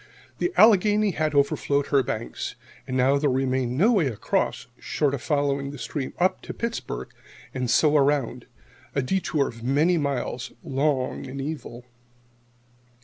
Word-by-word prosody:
The 355 - 0
Allegheny 210 -1 +5
had 155 -3 -1
overflowed 140 0 +2
her 140 -2 +4
banks, 115 -2 -4 0.3
and 130 - -2
now 135 +2 +3
there 145 0 +2
remained 130 -1 0
no 210 - +5
way 190 - +3
across, 115 -6 -1
short 145 -2 0
of 140 - -3
following 140 -1 0
the 145 - -8
stream 135 +1 -5
up 185 +1 +1
to - - -8
Pittsburgh 230 - -4 0.4
and 130 -2 -2
so 150 +6 +4
around, 145 -3 +1 0.5
a 140 - +1
détour 155 -2 0
of 115 -1 -9
many 155 +7 +2
miles, 135 -4 -3
long 135 -1 -1
and 135 +1 -7
evil. 135 -4 -6
140 Hz, 145 wpm, -25 LUFS, 130-155 Hz, 0.5 s, Allegheny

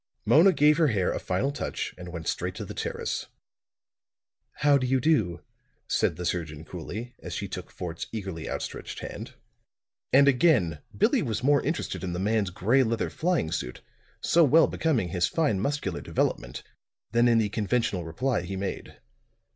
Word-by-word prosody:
Mona 170 +6 +6
gave 150 -1 +4
her 160 - +5
hair 100 -8 +1
a - - -2
final 95 +10 -1
touch 145 - -4
and 90 -1 -9
went 85 -2 -7
straight - - -2
to - - -5
the - - -7
terrace. - - -3 1.4
"How 145 -1 +6
do 130 - -1
you 130 +1 +2
do?" 110 - +1 0.4
said - - +1
the 90 +2 -5
surgeon 80 -3 -3
coolly, 105 +9 -7
as - - -6
she - - -3
took - - -7
Fort's 85 -2 -6
eagerly 95 -7 -5
outstretched - - -5
hand. - - -7 0.8
And 140 +1 +6
again 125 - +3 0.2
Billie 235 +4 +3
was 115 - -2
more 145 +1 +4
interested 130 - -3
in 90 -1 -3
the - - -3
man's 105 0 +1
gray 110 +9 +2
leather 115 -2 0
flying 170 - 0
suit, 60 - -4 0.4
so 170 - +4
well 160 +2 +6
becoming 130 - 0
his 85 0 +1
fine 150 - +1
muscular 105 - -2
development, - - -2 0.5
than 120 +2 +4
in 115 -1 +4
the 110 -2 +2
conventional 105 -3 0
reply 105 +7 -1
he 95 +2 -5
made. 95 +1 -5
110 Hz, 170 wpm, -27 LUFS, 90-140 Hz, 1.4 s, Mona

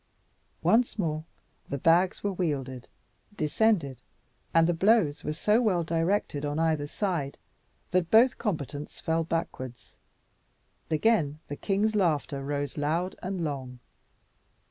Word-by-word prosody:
Once 235 +1 +3
more 155 -5 -2 0.4
the 140 - -2
bags 170 +6 +3
were 200 -1 0
wielded, 135 -8 -3 0.5
descended, 155 - +1 0.5
and 165 0 +5
the 175 - +2
blows 185 -4 +3
were - - -2
so 210 +9 +2
well 185 -7 +2
directed 165 -2 0
on 145 0 -2
either 160 -3 +1
side, 165 -6 -2 0.5
that 180 -2 +1
both 235 +3 +5
combatants 150 - -4
fell 165 0 0
backwards. 155 -7 -5 0.9
Again 155 -3 +2
the 145 - -3
king's 205 +6 0
laughter 150 -7 0
rose 145 0 -3
loud 165 +5 -1
and 185 -1 -3
long. 135 -4 -4
165 Hz, 120 wpm, -28 LUFS, 145-190 Hz, 0.9 s, and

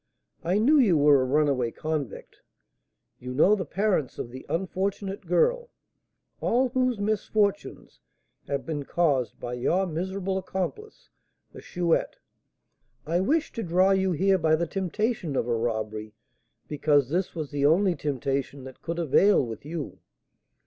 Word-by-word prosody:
I 180 +4 +1
knew 280 +8 +4
you 200 - +4
were 145 -2 +5
a - - 0
runaway 135 -3 +1
convict, 150 -2 -5 0.8
you 125 0 -6
know 185 +9 +5
the 185 -6 -1
parents 190 -5 0
of 120 - -5
the 130 +1 -10
unfortunate 190 +2 -3
girl, 485 - +2 0.7
all 255 +2 +1
whose 255 -1 0
misfortunes 205 0 -1 0.5
have 140 -1 -3
been 150 -3 -3
caused 140 -6 0
by 120 - -5
your 170 +10 +1
miserable 190 +3 -3
accomplice, 190 - -6 0.4
the - - -11
Chouette. 175 -2 0 0.9
I 165 +3 0
wished 300 - 0
to 230 - -4
draw 185 +1 +3
you 190 -1 +2
here 190 +3 +2
by 160 -1 +3
the 170 +2 -1
temptation 195 - -2
of 120 - 0
a 120 - +1
robbery, 110 -2 -3 0.5
because 145 -3 +2
this 180 +4 -1
was 155 -4 -5
the 145 0 +2
only 180 +4 +3
temptation 140 -2 -3
that 130 -1 -11
could 165 +1 -4
avail 170 +1 +4
with 115 +2 -8
you. 155 -1 -6
170 Hz, 145 wpm, -26 LUFS, 140-195 Hz, 0.9 s, were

